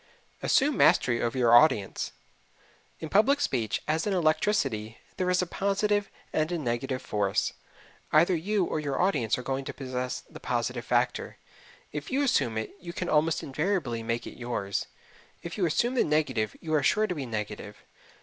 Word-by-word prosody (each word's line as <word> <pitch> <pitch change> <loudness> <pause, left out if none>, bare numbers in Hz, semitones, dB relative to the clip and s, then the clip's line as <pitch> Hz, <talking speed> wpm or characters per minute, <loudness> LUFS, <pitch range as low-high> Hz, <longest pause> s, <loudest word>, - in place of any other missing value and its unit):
Assume 285 +1 +3
Mastery 120 -2 +4
Over 120 +2 -1
Your 120 -2 +5
Audience 120 -6 +3 0.9
In 160 - -5
public 220 - +4
speech, 115 - -1
as 160 +5 0
in 205 - +1
electricity, 155 - +1 0.2
there 180 0 0
is 180 0 +3
a - - -1
positive 200 +3 0 0.2
and 155 +2 +1
a 175 - 0
negative 130 -1 -2
force. 100 -2 0 0.6
Either 170 +4 +5
you 195 +3 0
or 155 - -2
your 140 -3 -2
audience 135 - +2
are 125 - -6
going 135 +1 -2
to - - -6
possess 125 -1 -4
the - - -13
positive - - -2
factor. - - 0 0.5
If 150 -1 -5
you 275 +2 +1
assume 130 - +1
it 110 - -4
you 170 -1 -8
can 180 - -3
almost 155 +1 +2
invariably 145 - -1
make 115 +1 -2
it - - -10
yours. 115 -5 -2 0.6
If 170 - -6
you 185 -5 +1
assume 240 +10 +1
the 255 - +3
negative 150 -9 0
you 160 -1 -4
are 150 - +4
sure 215 +10 +3
to 185 - -2
be 140 -6 -5
negative. 105 -1 -5
150 Hz, 175 wpm, -28 LUFS, 120-180 Hz, 0.9 s, Your